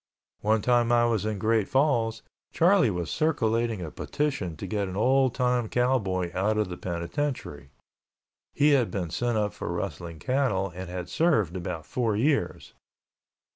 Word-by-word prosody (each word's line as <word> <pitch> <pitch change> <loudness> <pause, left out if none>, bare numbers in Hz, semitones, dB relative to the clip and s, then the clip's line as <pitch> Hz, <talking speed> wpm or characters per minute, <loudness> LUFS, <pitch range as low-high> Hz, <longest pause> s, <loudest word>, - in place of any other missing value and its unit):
One 110 0 +1
time 120 -1 +3
I 120 0 +4
was 110 -3 0
in 110 -1 -2
Great 110 +1 +1
Falls, 120 -5 +1 0.3
Charlie 175 - +4
was 90 -4 -3
circulating 115 - 0
a 80 - -6
petition 135 - -2
to - - -6
get 105 -2 -2
an 95 - -6
old 130 +3 +3
time 125 -3 +1
cowboy 100 -9 0
out 105 +4 0
of 105 -3 0
the 90 - -5
penitentiary. 85 - -4 0.8
He 145 +1 +3
had 130 -5 +3
been 90 -5 -4
sent 120 +3 0
up 105 -1 0
for - - -5
rustling 85 -1 -5
cattle 115 - 0
and 90 0 -7
had 90 -1 -5
served 140 - +1
about 85 -3 -5
four 115 -4 -1
years. 140 +5 0
110 Hz, 160 wpm, -27 LUFS, 95-130 Hz, 0.8 s, I